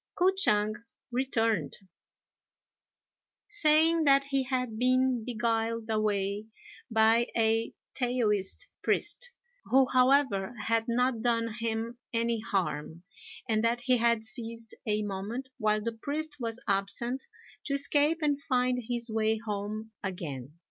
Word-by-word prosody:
K'o 365 +2 +5
ch'ang 215 - +2 0.3
returned, 235 -3 0 1.7
saying 325 -4 +4
that 275 -1 +5
he 275 -1 0
had 250 -4 -2
been 255 -1 +2
beguiled 230 -1 -1
away 210 -1 0 0.4
by 225 +1 +4
a 225 0 +1 0.2
Taoist 240 - 0 0.2
priest, - - 0 0.4
who, 265 +1 +5
however, 255 -5 +3
had 225 +2 +1
not 245 0 +1
done 230 -1 +1
him 230 +1 -2
any 230 -1 0
harm, 170 -5 -2 0.4
and 220 -1 +1
that 235 +1 +1
he 250 0 +3
had 235 -1 +2
seized 230 +2 -5
a 210 0 +1
moment 210 +6 -4
while 215 -1 +2
the 230 - -1
priest 295 +6 -4
was 230 -1 -3
absent 220 +6 -1 0.4
to 280 - -2
escape 295 +3 +2
and 290 -1 +1
find 250 -2 +1
his 240 -1 0
way 220 0 +1
home 215 0 -4
again. 150 -7 -5
230 Hz, 120 wpm, -29 LUFS, 215-255 Hz, 1.7 s, K'o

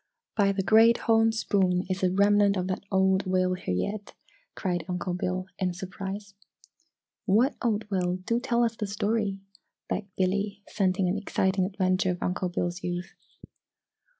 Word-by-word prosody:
"By 200 -2 +3
the 195 -1 -1
Great 225 +3 +6
Horn 225 0 +3
Spoon! 190 -5 +1
Is 185 0 -2
a 185 - +3
remnant 200 +1 +4
of 180 - -1
that 185 0 -3
old 190 0 +2
whale 185 0 +2
here 180 - -3
yet!" 200 - -4 0.4
cried 175 -3 -2
Uncle 180 0 -2
Bill, 180 +1 -2
in 180 -2 -1
surprise. 195 +2 -6 0.9
"What 235 +9 +3
old 220 -3 0
whale 180 -2 0
do 185 +6 -1
tell 240 0 +1
us 230 -1 0
the 210 - -3
story!" 205 0 -1 0.5
begged 205 -1 -3
Billy, 200 +2 -1
scenting 190 -2 +1
an 190 +3 0
exciting 190 -2 +1
adventure 185 -1 +1
of 180 -1 -2
Uncle 180 0 -1
Bill's 175 0 -3
youth. 175 0 -4
190 Hz, 155 wpm, -27 LUFS, 185-205 Hz, 0.9 s, Great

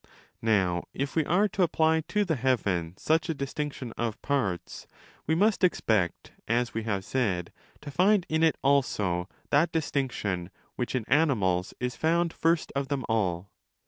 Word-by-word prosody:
Now 95 -6 +1
if 140 +1 -3
we 160 - +3
are 190 +7 +3
to 195 - -2
apply 160 -2 +3
to 210 0 +1
the 165 -4 0
heaven 100 -10 0
such 160 +2 +1
a 165 - 0
distinction 140 -3 -4
of 115 -2 -2
parts, 115 -11 -2 0.4
we 160 - +2
must 205 +3 +2
expect, 110 - +1 0.2
as 120 +1 0
we 115 - -2
have 100 -4 -2
said, 95 -10 -1 0.3
to 145 -1 -8
find 190 +4 +3
in 160 0 0
it 160 -2 +3
also 105 -10 +1 0.2
that 155 +4 +3
distinction 125 - -2 0.3
which 125 +1 -3
in 120 -4 -1
animals 105 - +2
is 125 0 -2
found 170 +1 +1
first 165 0 +1
of 140 0 -1
them 140 -2 -2
all. 95 -4 0
135 Hz, 160 wpm, -28 LUFS, 100-160 Hz, 0.4 s, we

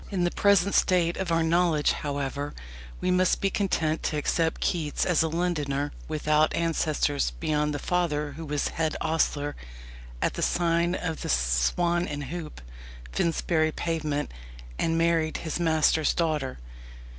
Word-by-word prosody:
In 190 -4 -1
the 175 - +1
present 200 -1 +3
state 175 -2 +3
of 190 -3 -2
our 165 0 +3
knowledge, 165 -2 +3
however, 145 0 -3 0.5
we 185 - +1
must 180 0 +3
be 195 - 0
content 160 -6 0
to 155 - -1
accept 160 +2 0
Keats 155 -4 0
as 180 -3 +3
a 160 - +2
Londoner 150 -4 -1 0.2
without 155 0 +2
ancestors 155 - 0
beyond 150 -1 0
the 145 - -2
father 150 -2 -1
who 160 +4 -8
was 150 -2 -1
head 160 -1 -1
ostler 150 -2 0 0.6
at - - 0
the - - -4
sign 170 +1 +1
of 165 -4 -4
the - - -4
"Swan 60 - +1
and 145 -1 -4
Hoop," 155 - -7 0.5
Finsbury 160 - +1
Pavement, 155 -3 -2 0.5
and 165 0 +1
married 165 -1 +2
his 160 +1 -4
master's 160 -2 +2
daughter. 155 -6 -1
160 Hz, 145 wpm, -27 LUFS, 150-170 Hz, 0.6 s, present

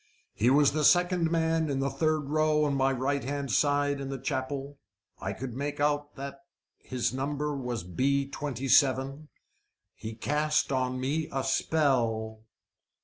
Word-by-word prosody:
He 115 - +2
was 140 +1 +5
the 155 +1 -1
second 175 0 +4
man 160 -1 +1
in 140 - -1
the 135 0 0
third 155 +3 +1
row 155 +1 +1
on 145 -2 +1
my 135 0 +2
right 135 +2 -1
hand 140 0 -3
side 145 +3 +2
in 135 -1 -5
chapel. 140 +1 -3 0.4
I 95 - -3
could 125 +3 -6
make 140 +3 -4
out 145 0 0
that 140 0 -7 0.4
his 125 -1 -2
number 145 +2 -2
was 125 -6 -4
B 135 +10 0
27. 135 +1 +1 0.7
He 110 0 -7
cast 150 +5 0
on 130 -1 0
me 150 +5 -1
a 135 -1 -1
spell." 120 -7 0
140 Hz, 145 wpm, -29 LUFS, 130-150 Hz, 0.7 s, was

